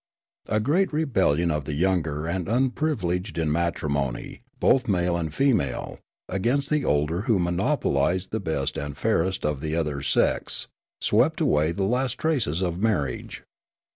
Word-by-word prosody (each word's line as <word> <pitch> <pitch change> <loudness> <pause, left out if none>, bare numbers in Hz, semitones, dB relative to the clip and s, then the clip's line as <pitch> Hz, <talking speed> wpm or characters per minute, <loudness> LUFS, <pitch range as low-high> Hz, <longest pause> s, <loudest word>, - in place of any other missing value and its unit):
A 105 - +2
great 160 - +2
rebellion 95 - +1
of 75 -2 -2
the 75 - -3
younger 80 -3 0
and 90 +1 -2
unprivileged 115 - 0
in 80 -2 0
matrimon}', 75 -6 -2 0.2
both 130 -1 +3
male 90 -3 +1
and 80 -3 -2
female, 110 - 0 0.3
against 125 +10 0
the 150 -2 +2
older 75 - +1
who 110 - +5
monopolised 90 - 0
the 110 - -1
best 80 -8 -2
and 70 0 -5
fairest 95 -1 0
of 75 -2 -1
the 80 0 -2
other 75 -4 -1
sex - - +1 0.3
swept - - +2
away 75 +2 +2
the 95 +3 -2
last 125 +5 0
traces 115 - 0
of 90 0 -2
marriage. 85 - -1
90 Hz, 145 wpm, -25 LUFS, 75-115 Hz, 0.3 s, who